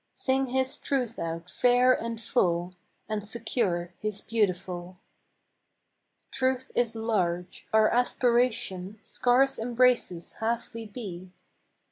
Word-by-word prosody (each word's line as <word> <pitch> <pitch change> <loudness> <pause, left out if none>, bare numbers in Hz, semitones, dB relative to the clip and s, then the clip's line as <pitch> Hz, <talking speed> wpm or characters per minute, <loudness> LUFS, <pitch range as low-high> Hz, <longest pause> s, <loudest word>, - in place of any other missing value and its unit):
Sing 265 0 +1
His 260 +1 0
Truth 250 -4 -1
out 165 +1 -4
fair 250 +4 +4
and 230 -2 -3
full, 180 -6 0 0.3
And 215 -1 -2
secure 195 -5 -1
His 215 -1 -3
beautiful. 185 -4 -2 1.3
Truth 260 0 0
is 235 -2 +1
large. 180 -6 -1
Our 220 0 +5
aspiration 240 -5 +1
Scarce 260 +2 +2
embraces 235 -7 +2
half 225 +1 -2
we 230 -1 -6
be. 190 -5 -7
225 Hz, 105 wpm, -28 LUFS, 185-245 Hz, 1.3 s, Our